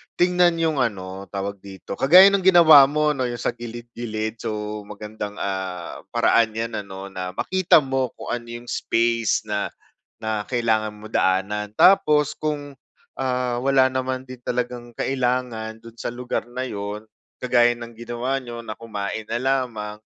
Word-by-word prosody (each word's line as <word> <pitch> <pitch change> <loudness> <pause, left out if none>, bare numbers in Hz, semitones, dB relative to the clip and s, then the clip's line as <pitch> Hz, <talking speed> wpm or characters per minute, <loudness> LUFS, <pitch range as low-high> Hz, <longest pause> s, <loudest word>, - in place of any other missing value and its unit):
tingnan 180 -1 +3
yung 160 -1 +1
ano 95 -5 -2
tawag 100 0 -3
dito 95 -1 -8
kagaya 175 +9 +8
ng 200 -1 +1
ginawa 165 -6 +9
mo 150 +1 +1
'no, 130 -2 -1
yung 120 -1 -5
sa - - 0
gilid-gilid. 115 -2 -6
So, 105 -1 -4
magandang, 105 0 -7
ah, 95 -3 -4
paraan 115 -2 +3
'yan 115 0 -3
ano 95 0 -8
na 90 -1 -5
makita 185 -4 +3
mo 130 -2 -1
kung - - -8
ano 120 -1 -4
yung 120 +1 -8
space 115 -1 +1
na, 105 -1 -1 0.5
na 110 -2 -2
kailangan 110 -3 0
mo 105 +1 -11
daanan. 100 +3 +1
Tapos 150 -6 +5
kung, 145 -2 -4 0.5
ah, 125 -2 -1
wala 135 0 +4
naman 130 0 -2
din 130 0 -9
talagang 120 0 -3
kailangan 125 -4 -1
do'n 115 0 -14
sa - - -3
lugar 125 0 -4
na 130 +1 -4
'yon 105 -1 -5 0.4
kagaya 120 -1 +4
ng 120 0 -9
ginawa 120 +3 -3
niyo 120 -2 -8
na 110 - -5
kumain 110 -1 -5
na 120 - -1
lamang. 120 -5 -2
120 Hz, 155 wpm, -23 LUFS, 105-130 Hz, 0.5 s, ginawa